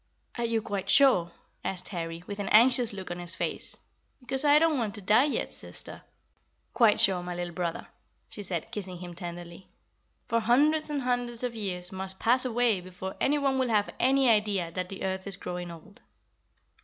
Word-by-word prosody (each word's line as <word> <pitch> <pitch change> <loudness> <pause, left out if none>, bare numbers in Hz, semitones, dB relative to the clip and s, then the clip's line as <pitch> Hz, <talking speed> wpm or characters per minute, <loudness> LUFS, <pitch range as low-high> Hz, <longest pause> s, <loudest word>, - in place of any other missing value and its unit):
"Are 240 - -2
you 230 -1 0
quite 200 -3 -4
sure?" 215 -12 +5 0.3
asked 180 -1 -5
Harry, 165 -2 -5
with 200 +1 -7
an 200 - -3
anxious 245 +1 +6
look 190 -3 -7
on 175 - -5
his 175 0 -3
face; - - -3 0.4
"because 265 +1 0
I 290 0 +6
don't 315 -3 +3
want 215 -3 -2
to 210 - -7
die 215 +8 +5
yet, 295 - -2
sister." - - -3 0.7
"Quite 230 -4 +4
sure, 185 -2 +4
my 175 0 -5
little 175 0 -4
brother," 170 -1 -3 0.4
she 210 - -7
said, 175 -5 -3
kissing 190 -3 -5
him 175 0 -8
tenderly; 175 +1 -8 0.6
"for 230 - +1
hundreds 295 +8 +3
and 285 -3 -2
hundreds 245 -1 0
of 245 -1 -2
years 185 -5 -2
must 190 0 -6
pass 250 +5 +3
away 240 -5 +1
before 185 +1 -7
anyone 275 -2 +1
will 255 -2 +1
have 210 -2 +1
any 265 +1 +3
idea 205 -6 +2
that 180 +1 -4
the 195 - -7
earth 190 0 -3
is 195 - -4
growing 175 0 -5
old." 170 +5 -13
205 Hz, 185 wpm, -28 LUFS, 180-245 Hz, 0.7 s, anxious